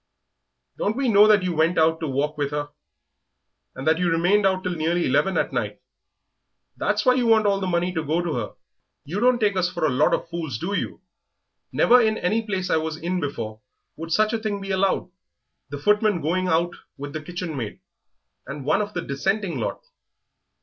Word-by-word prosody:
"Don't 215 +4 -1
we 270 -2 +1
know 210 -1 +7
that 210 -3 +5
you 180 -1 -1
went 165 +2 +2
out 160 0 +3
to 160 - -3
walk 145 +3 -1
with 145 -2 -1
her, 145 0 -3 1.1
and 135 - -7
that 160 +1 +3
you 180 -1 +1
remained 180 +5 +3
out 185 -1 0
till 180 - -1
nearly 170 +1 0
eleven 190 -1 +2
at - - 0
night. - - -2 1.0
That's - - 0
why 255 - +6
you 250 -2 +1
want 220 -1 +4
all 200 -1 +2
the 190 - -2
money 175 0 0
to 160 -2 -2
go 155 +3 0
to 170 -3 -2
her. 115 -5 -4 0.5
You 175 +8 -3
don't 250 +2 +4
take 210 -4 +1
us 180 -1 +1
for 160 - -1
a 150 - +2
lot 140 +4 +3
of - - -6
fools, 165 -8 -4
do 190 - -4
you? - - -3 0.7
Never 245 +1 +5
in 220 -1 +1
any 210 +6 0
place 190 -4 -3
I - - +4
ever 160 - -1
was 160 -1 -4
in 175 +3 -2
before 115 -8 -5 0.3
would 165 +1 -7
such 215 +6 +2
a 225 - 0
thing 215 -2 -3
be 195 0 -5
allowed 190 -1 0 0.6
the 145 - -5
footman 210 +4 +2
going 180 +4 0
out 170 0 +1 0.2
with 145 +1 -7
the 155 - -4
kitchen 175 0 -5
maid, 115 -6 -5 0.7
and 140 -1 -7
one 155 +8 +2
of 205 0 -5
the 180 - -2
Dissenting 190 +7 -1
lot." - - -4
175 Hz, 210 wpm, -24 LUFS, 155-205 Hz, 1.1 s, know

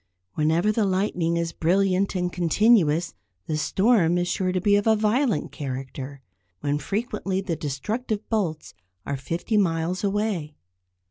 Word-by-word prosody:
Whenever 160 - +2
the 215 0 +1
lightning 185 -3 0
is 170 -1 -1
brilliant 190 +3 +1
and 180 -1 -1
continuous 175 -2 +3 0.3
the 155 - -2
storm 180 +1 +3
is 175 0 0
sure 185 0 0
to 185 - 0
be 200 +3 +3
of 205 +2 +1
a 220 - +5
violent 220 +3 +1
character, 135 -1 -6 0.4
when 145 0 0
frequently 195 - -2
the 190 -4 -2
destructive 205 - -3
bolts 180 -9 -2 0.3
are 140 - -2
fifty 170 - -2
miles 175 -1 0
away. 200 -7 -1
180 Hz, 140 wpm, -25 LUFS, 160-205 Hz, 0.4 s, a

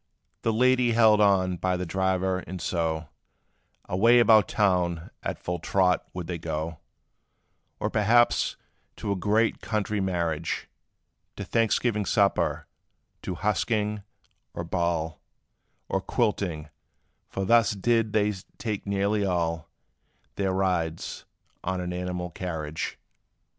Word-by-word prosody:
"The 115 - +1
lady 125 +1 +3
held 110 -2 +5
on 95 -3 +3
by 90 +1 0
the 90 - -3
driver; 95 +1 0
and 90 +1 -7
so, 80 -3 -1 0.8
Away 115 +7 +4
about 110 -4 +6
town 90 -5 +1
at - - -3
full 90 0 -4
trot 90 +2 +1
would 90 -1 -5
they 85 0 -4
go; 80 0 -4 1.0
Or - - -1
perhaps 115 +3 +3 0.4
to 100 - -4
a - - +1
great 105 +4 +1
country 105 -1 -1
marriage 85 -4 -1 0.7
To - - -5
Thanksgiving 115 -2 +1
supper 100 -2 +2 0.6
to 90 - -4
husking, 105 +2 0 0.5
or 85 - -3
ball; 85 -2 -1 0.7
Or 95 - -1
quilting; 95 -10 -1 0.6
for 95 - -3
thus 115 +2 +4
did 115 +2 +1
they 105 0 +2 0.3
take 105 -3 -4
nearly 100 +1 +1
all 85 -3 -1 0.6
Their 95 -1 -1
rides, 90 -4 -1 0.4
on 95 +1 -1
an 90 0 -3
animal 90 -1 -3
carriage. 80 -3 -4
95 Hz, 120 wpm, -27 LUFS, 85-105 Hz, 1.0 s, about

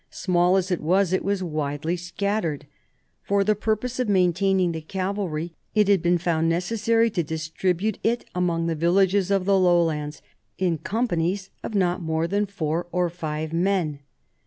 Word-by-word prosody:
Small 180 0 +2
as 190 0 -1
it 180 - 0
Was, 185 +3 +2
it 185 - +1
was 200 -1 -1
widely 155 0 -2
scattered. 180 -3 -2 0.6
For 200 0 +1
the 215 +2 +3
purpose 220 +4 -2
of 250 -4 0
maintaining 185 -1 +2
the 160 -1 -5
cavalry, 185 -2 -3 0.2
it 210 -2 +4
had 200 -3 +4
been 175 +1 +3
found 165 -1 0
necessary 225 +6 +1
to 180 - 0
distribute 170 +6 -2
it 235 +1 0
among 170 -2 0
the 165 - 0
villages 185 +4 +2
of 195 -2 +1
the 195 0 +4
lowlands, 165 -4 +1 0.3
in 175 -4 0
companies 190 -3 -1
of 220 - -5
not 180 -2 +1
more 160 0 -1
than 205 +3 0
four 170 -3 -2
or 180 -1 0
five 155 -2 -4
men. 170 -4 0
180 Hz, 160 wpm, -24 LUFS, 165-200 Hz, 0.6 s, it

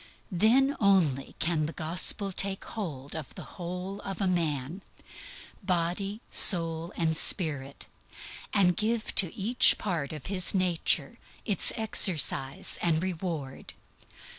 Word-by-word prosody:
Then 245 +9 +1
only 175 - 0
can 155 -2 -2
the 160 - -8
Gospel 180 +5 +3
take 195 +1 -3
hold 150 - -7
of 155 -4 -9
the - - -9 0.2
whole 180 +3 -7
of 195 -1 -8
a 200 - -1
man, 165 -2 -3 0.8
body, 185 +3 -3
soul 165 -2 +5
and 160 -1 -1
spirit, 145 -6 +2 0.7
and 180 -3 +2
give 220 +1 -3
to 185 -4 +5
each 230 +5 +4
part 170 -9 -5
of 150 -4 -10
his 185 0 -1
nature 180 0 -1 0.3
its 200 -5 +3
exercise 160 - 0
and 165 -1 0
reward. 165 -7 -6
175 Hz, 120 wpm, -26 LUFS, 155-195 Hz, 0.8 s, soul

